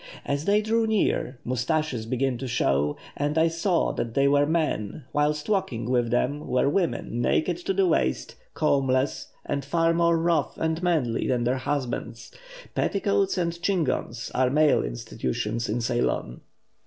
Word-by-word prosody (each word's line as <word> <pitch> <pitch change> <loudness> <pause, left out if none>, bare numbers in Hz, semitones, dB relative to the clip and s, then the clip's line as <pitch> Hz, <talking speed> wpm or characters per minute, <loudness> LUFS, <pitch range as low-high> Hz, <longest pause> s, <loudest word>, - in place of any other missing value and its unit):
As 140 +2 -2
they 210 +1 +3
drew 225 +1 +1
near, 200 - 0
moustaches 125 -1 -1
began 130 +2 0
to 130 - -4
show, 75 - +1 0.2
and 145 +2 -1
I 160 +1 +5
saw 170 +2 +1
that 115 -1 -4
they 140 0 +4
were 145 +1 +3
men, 155 -7 -1
whilst 150 0 0
walking 140 - -1
with 120 -2 +1
them 135 +5 0
were 125 +2 +2
women 150 -7 -1
naked 165 +7 +1
to 175 +2 -2
the 195 0 +3
waist, 65 - 0 0.2
combless, 135 -1 +1 0.2
and 140 - -2
far 165 +4 +2
more 170 0 +3
rough 165 -3 0
and 160 +1 -1
'manly' 155 -10 0
than 125 -2 +1
their 125 +2 +1
husbands. 130 -3 -4 0.4
Petticoats 200 -1 +1
and 170 -1 -2
chignons 160 - -1
are 130 0 +2
male 150 +2 +4
institutions 65 - -3
in 115 +3 -1
Ceylon." 120 - -1
140 Hz, 155 wpm, -26 LUFS, 120-165 Hz, 0.4 s, I